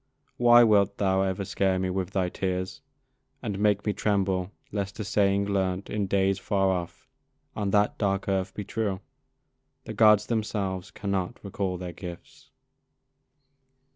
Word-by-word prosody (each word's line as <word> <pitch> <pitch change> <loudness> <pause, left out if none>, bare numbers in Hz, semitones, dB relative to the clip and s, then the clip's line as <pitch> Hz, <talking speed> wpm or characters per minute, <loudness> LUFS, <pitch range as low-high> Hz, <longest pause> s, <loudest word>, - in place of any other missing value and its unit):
Why 120 0 +7
wilt 100 -3 +3
thou 95 -1 +2
ever 95 0 -1
scare 95 0 +1
me 95 0 -1
with 95 -1 -2
thy 95 -1 0
tears, 95 +8 -3 0.6
And 100 -4 -3
make 105 -1 +2
me 105 - +1
tremble 95 -3 0 0.2
lest 100 0 -4
a - - -1
saying 100 -1 +2
learnt, 95 -1 -1
In 105 -2 -1
days 95 0 +1
far 95 -1 +1
off, 90 -2 -5 0.5
on 105 -2 -1
that 105 +1 +2
dark 100 -2 0
earth, 95 -1 0
be 105 - -4
true? 100 -2 -2 0.8
'The - - -7
Gods 105 -1 +5
themselves 100 -4 -2
cannot 100 +2 -3
recall 95 -2 -3
their 90 -1 -6
gifts.' 85 -2 -10
100 Hz, 145 wpm, -27 LUFS, 95-105 Hz, 0.8 s, Why